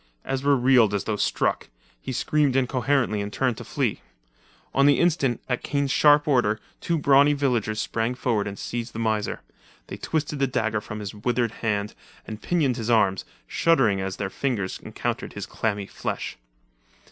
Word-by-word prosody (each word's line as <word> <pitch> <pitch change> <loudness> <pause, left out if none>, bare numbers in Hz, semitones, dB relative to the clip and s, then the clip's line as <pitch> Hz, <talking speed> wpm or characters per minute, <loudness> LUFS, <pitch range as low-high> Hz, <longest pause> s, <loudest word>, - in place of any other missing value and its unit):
Ezra 140 +1 +2
reeled 125 -5 +4
as 100 - -1
though 110 - -1
struck; - - 0 0.3
he - - -5
screamed 145 +1 +1
incoherently 130 -4 +1
and 100 0 -4
turned 130 -1 0
to - - -8
flee. - - -2 0.7
On 140 +1 +4
the 145 - +4
instant, 150 -8 +2
at 125 -2 -1
Kane's 140 -1 -1
sharp 150 +1 +5
order, 120 -7 +2 0.2
two 170 - -1
brawny 140 0 +5
villagers 120 -7 0
sprang 115 +3 -1
forward 115 -5 0
and 100 0 -6
seized 120 0 -5
the - - -7
miser. 110 -2 -1 0.5
They - - -6
twisted 150 -2 -2
the 135 - +2
dagger 110 -4 -1
from 105 +1 -7
his 100 -1 -5
withered 120 +2 0
hand, 105 -2 -1 0.3
and 110 0 -8
pinioned 150 -8 +1
his 115 -1 -3
arms, 100 -5 +2 0.2
shuddering 115 - +2
as 95 0 -3
their 100 -2 -3
fingers 110 -8 -2
encountered - - -4
his - - -5
clammy 105 -3 -2
flesh. - - -4
120 Hz, 170 wpm, -25 LUFS, 105-140 Hz, 0.7 s, sharp